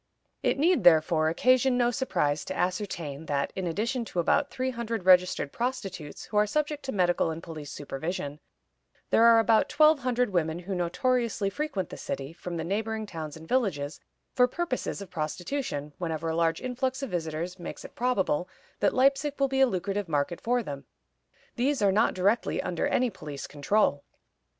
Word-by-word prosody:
It -, -, +1 dB
need, 340 Hz, +5 st, +3 dB
therefore, 160 Hz, -1 st, +5 dB
occasion 255 Hz, +7 st, +3 dB
no 240 Hz, -1 st, +3 dB
surprise 170 Hz, -, 0 dB
to 190 Hz, -, -5 dB
ascertain 170 Hz, -5 st, -3 dB
that, 140 Hz, -1 st, -1 dB
in 185 Hz, -2 st, -2 dB
addition 230 Hz, +9 st, -1 dB
to 180 Hz, -, -4 dB
about 280 Hz, -, +2 dB
three 260 Hz, 0 st, -2 dB
hundred 230 Hz, -5 st, -4 dB
registered 180 Hz, -5 st, +4 dB
prostitutes 200 Hz, -, -4 dB
who 210 Hz, -, -3 dB
are 210 Hz, 0 st, +4 dB
subject 300 Hz, +4 st, -1 dB
to 265 Hz, -, -2 dB
medical 175 Hz, -5 st, +2 dB
and 160 Hz, +1 st, -5 dB
police 155 Hz, -4 st, -8 dB
supervision, 150 Hz, +1 st, -5 dB, 0.7 s
there 230 Hz, -, +6 dB
are 230 Hz, -1 st, +8 dB
about 225 Hz, -1 st, +4 dB
twelve 305 Hz, 0 st, +5 dB
hundred 250 Hz, -3 st, 0 dB
women 160 Hz, -3 st, 0 dB
who 180 Hz, +3 st, -5 dB
notoriously 210 Hz, +3 st, 0 dB
frequent 280 Hz, -, -3 dB
the -, -, -8 dB
city, 135 Hz, +3 st, -5 dB
from 175 Hz, 0 st, -6 dB
the 160 Hz, -, -2 dB
neighboring 220 Hz, +4 st, -2 dB
towns 160 Hz, -6 st, -7 dB
and 160 Hz, 0 st, -12 dB
villages, 165 Hz, -, 0 dB, 0.3 s
for 250 Hz, -1 st, +5 dB
purposes 255 Hz, -8 st, -3 dB
of 185 Hz, -, -14 dB
prostitution, 155 Hz, -, -3 dB
whenever 165 Hz, -2 st, -2 dB
a 160 Hz, -, -1 dB
large 165 Hz, -1 st, +1 dB
influx 260 Hz, +2 st, -2 dB
of 270 Hz, -, -4 dB
visitors 170 Hz, +1 st, -3 dB
makes 175 Hz, -, -7 dB
it -, -, -11 dB
probable 190 Hz, -8 st, 0 dB, 0.3 s
that 205 Hz, -, +2 dB
Leipzig 275 Hz, +2 st, +2 dB
will 275 Hz, -, +3 dB
be 265 Hz, 0 st, 0 dB
a 265 Hz, -, +7 dB
lucrative 195 Hz, -2 st, -2 dB
market 150 Hz, +3 st, -1 dB
for 245 Hz, +1 st, +1 dB
them. 140 Hz, -6 st, -6 dB, 0.7 s
These 275 Hz, +4 st, +1 dB
are 200 Hz, -, +5 dB
not 215 Hz, +4 st, +2 dB
directly 200 Hz, +5 st, +1 dB
under 175 Hz, -2 st, -1 dB
any 250 Hz, -1 st, +1 dB
police 145 Hz, -6 st, -7 dB
control. 145 Hz, 0 st, +1 dB
190 Hz, 175 wpm, -28 LUFS, 165-250 Hz, 0.7 s, are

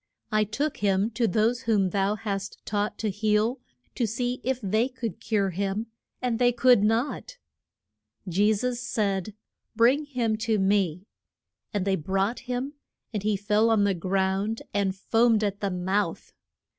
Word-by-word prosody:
I 215 Hz, 0 st, +3 dB
took 275 Hz, +9 st, -2 dB
him 200 Hz, +2 st, +1 dB
to 230 Hz, +1 st, +1 dB
those 225 Hz, +5 st, +1 dB
whom 200 Hz, -5 st, +1 dB
thou 200 Hz, +2 st, +1 dB
hast 200 Hz, -2 st, -4 dB
taught 205 Hz, 0 st, -1 dB
to 215 Hz, -2 st, -1 dB
heal, 215 Hz, +4 st, +1 dB, 0.3 s
to 235 Hz, -, 0 dB
see 245 Hz, +3 st, -2 dB
if 260 Hz, -1 st, 0 dB
they 215 Hz, +2 st, +1 dB
could 240 Hz, -6 st, -5 dB
cure 200 Hz, -3 st, 0 dB
him; 200 Hz, +5 st, -2 dB, 0.3 s
and 240 Hz, -2 st, 0 dB
they 245 Hz, -1 st, +4 dB
could 245 Hz, -3 st, +4 dB
not. 235 Hz, -, 0 dB, 0.9 s
Je 200 Hz, +5 st, +3 dB
sus 240 Hz, +3 st, -1 dB
said, 200 Hz, -4 st, -1 dB, 0.4 s
Bring 250 Hz, +7 st, +4 dB
him 240 Hz, -6 st, -1 dB
to 220 Hz, 0 st, 0 dB
me. 190 Hz, -3 st, +1 dB, 0.7 s
And 205 Hz, -3 st, -1 dB
they 195 Hz, -1 st, +2 dB
brought 195 Hz, +8 st, -1 dB
him; 255 Hz, +3 st, -2 dB, 0.4 s
and 210 Hz, -, -1 dB
he 210 Hz, 0 st, +1 dB
fell 210 Hz, +3 st, +2 dB
on 220 Hz, -2 st, +4 dB
the 200 Hz, -1 st, +3 dB
ground 190 Hz, +4 st, -1 dB
and 195 Hz, -2 st, 0 dB
foamed 225 Hz, +2 st, +2 dB
at 200 Hz, -1 st, -1 dB
the 200 Hz, -, -1 dB
mouth. 190 Hz, +3 st, -2 dB
215 Hz, 155 wpm, -26 LUFS, 195-235 Hz, 0.9 s, they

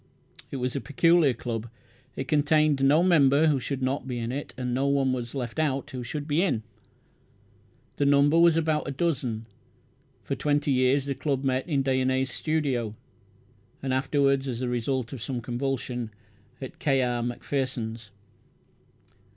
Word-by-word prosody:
It -, -, -6 dB
was 125 Hz, -1 st, -2 dB
a -, -, -1 dB
peculiar 150 Hz, +2 st, +3 dB
club. 115 Hz, -1 st, -4 dB, 0.5 s
It 130 Hz, -, -4 dB
contained 150 Hz, -1 st, +3 dB
no 150 Hz, +5 st, +5 dB
member 150 Hz, -4 st, +5 dB
who 150 Hz, -4 st, +3 dB
should 135 Hz, +1 st, -3 dB
not 130 Hz, +1 st, -1 dB
be 125 Hz, -2 st, -3 dB
in 115 Hz, 0 st, -3 dB
it; 140 Hz, +3 st, -5 dB
and 125 Hz, -1 st, -2 dB
no 135 Hz, +2 st, +1 dB
one 140 Hz, -2 st, +2 dB
was 120 Hz, 0 st, -4 dB
left 125 Hz, +1 st, -4 dB
out 140 Hz, -3 st, -1 dB
who 130 Hz, -, -5 dB
should 145 Hz, +5 st, -5 dB
be 155 Hz, +2 st, +2 dB
in. 125 Hz, -, 0 dB, 1.3 s
The 140 Hz, -, +2 dB
number 145 Hz, +3 st, +5 dB
was 170 Hz, -1 st, +5 dB
about 155 Hz, -2 st, 0 dB
a -, -, -2 dB
dozen. 130 Hz, -7 st, -2 dB, 0.8 s
For -, -, -3 dB
twenty 145 Hz, -1 st, 0 dB
years 130 Hz, +1 st, +3 dB
the 140 Hz, -, -1 dB
club 135 Hz, -1 st, -2 dB
met 130 Hz, +1 st, 0 dB
in 140 Hz, -3 st, +1 dB
Dyonnet's 130 Hz, 0 st, +1 dB
studio, 135 Hz, -10 st, -1 dB, 0.9 s
and 130 Hz, -1 st, -1 dB
afterwards, 135 Hz, 0 st, +1 dB
as 120 Hz, -3 st, -3 dB
the 125 Hz, -, -1 dB
result 125 Hz, +1 st, -2 dB
of 130 Hz, -, -7 dB
some 125 Hz, +2 st, -3 dB
convulsion, 125 Hz, -1 st, -3 dB, 0.5 s
in 130 Hz, -, -6 dB
K. 135 Hz, -3 st, +2 dB
R. 120 Hz, -1 st, 0 dB
Macpherson's. 120 Hz, -3 st, -3 dB
135 Hz, 160 wpm, -27 LUFS, 125-145 Hz, 1.3 s, no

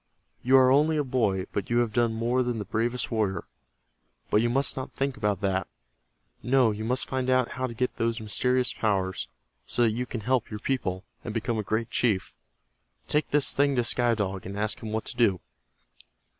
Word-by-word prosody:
"You 130 Hz, +2 st, +5 dB
are 130 Hz, -1 st, +6 dB
only 155 Hz, +3 st, +4 dB
a 150 Hz, -, +2 dB
boy, 110 Hz, -8 st, 0 dB
but 100 Hz, -, -3 dB
you 120 Hz, -, +2 dB
have 120 Hz, -3 st, +1 dB
done 120 Hz, 0 st, +2 dB
more 120 Hz, +3 st, +1 dB
than 120 Hz, -2 st, -1 dB
the 105 Hz, -, -4 dB
bravest 120 Hz, +6 st, -1 dB
warrior. 100 Hz, -6 st, 0 dB, 0.9 s
But 105 Hz, -, +4 dB
you 120 Hz, -, +1 dB
must 135 Hz, +2 st, +1 dB
not 130 Hz, -, -5 dB
think 135 Hz, -1 st, -1 dB
about 105 Hz, -3 st, -1 dB
that. 95 Hz, -1 st, 0 dB, 0.7 s
No, 125 Hz, -2 st, +3 dB
you 105 Hz, +1 st, -5 dB
must 125 Hz, +3 st, -1 dB
find 130 Hz, -1 st, -2 dB
out 130 Hz, -1 st, +3 dB
how 130 Hz, 0 st, -2 dB
to 115 Hz, -, -8 dB
get 125 Hz, +2 st, -1 dB
those 115 Hz, 0 st, 0 dB
mysterious 125 Hz, +4 st, +1 dB
powers, 95 Hz, -4 st, -1 dB, 0.4 s
so 120 Hz, -, +1 dB
that 115 Hz, -, +4 dB
you 125 Hz, +3 st, -3 dB
can 120 Hz, -, -5 dB
help 125 Hz, +2 st, 0 dB
your 105 Hz, -, -5 dB
people, 100 Hz, -8 st, -2 dB, 0.2 s
and 115 Hz, -2 st, -5 dB
become 115 Hz, 0 st, -1 dB
a -, -, +1 dB
great 110 Hz, +3 st, -2 dB
chief. 105 Hz, -7 st, 0 dB, 0.7 s
Take 150 Hz, 0 st, +1 dB
this 145 Hz, -1 st, +2 dB
thing 140 Hz, 0 st, +3 dB
to 120 Hz, -, +2 dB
Sky 120 Hz, 0 st, +2 dB
Dog, 95 Hz, -3 st, -3 dB
and 100 Hz, +1 st, -6 dB
ask 105 Hz, +1 st, -1 dB
him 110 Hz, -, -5 dB
what 110 Hz, 0 st, -2 dB
to -, -, -4 dB
do." 110 Hz, -7 st, +3 dB
115 Hz, 205 wpm, -27 LUFS, 105-130 Hz, 0.9 s, are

